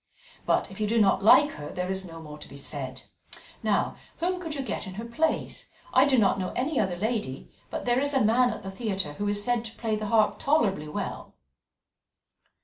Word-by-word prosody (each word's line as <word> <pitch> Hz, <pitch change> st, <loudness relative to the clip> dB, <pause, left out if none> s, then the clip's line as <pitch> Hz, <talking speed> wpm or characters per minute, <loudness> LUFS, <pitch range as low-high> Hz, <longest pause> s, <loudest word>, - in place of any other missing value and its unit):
But -, -, +2 dB
if 195 Hz, -, -10 dB
you 210 Hz, -, +1 dB
do 230 Hz, +2 st, +2 dB
not 195 Hz, -2 st, +3 dB
like 290 Hz, +7 st, +7 dB
her, 145 Hz, -, -7 dB
there 180 Hz, +1 st, -3 dB
is 190 Hz, 0 st, -2 dB
no 165 Hz, -1 st, -9 dB
more 150 Hz, -2 st, -10 dB
to -, -, -10 dB
be 140 Hz, -, -11 dB
said. 140 Hz, -2 st, -4 dB, 0.6 s
Now, -, -, +1 dB, 0.2 s
whom 360 Hz, +2 st, -1 dB
could 320 Hz, -4 st, -4 dB
you 275 Hz, -, -2 dB
get 250 Hz, -, -4 dB
in 185 Hz, -, -7 dB
her 225 Hz, +3 st, -5 dB
place? 310 Hz, +8 st, -1 dB, 0.2 s
I 260 Hz, -, +6 dB
do 270 Hz, -2 st, +3 dB
not 200 Hz, -3 st, +3 dB
know 185 Hz, -, -2 dB
any 275 Hz, +3 st, 0 dB
other 190 Hz, -4 st, +1 dB
lady, 210 Hz, -, -3 dB, 0.2 s
but -, -, -4 dB
there 245 Hz, 0 st, +3 dB
is 285 Hz, +1 st, +1 dB
a 260 Hz, -, +4 dB
man 245 Hz, +3 st, +4 dB
at 220 Hz, -, -5 dB
the 195 Hz, -, -5 dB
theatre 190 Hz, -7 st, -2 dB
who 205 Hz, +7 st, -3 dB
is 205 Hz, 0 st, 0 dB
said 240 Hz, 0 st, +1 dB
to 225 Hz, -, -8 dB
play 220 Hz, -2 st, -1 dB
the 215 Hz, 0 st, -3 dB
harp 215 Hz, -1 st, +3 dB
tolerably 205 Hz, -, +2 dB
well." 180 Hz, +7 st, -5 dB
215 Hz, 220 wpm, -27 LUFS, 190-245 Hz, 0.6 s, like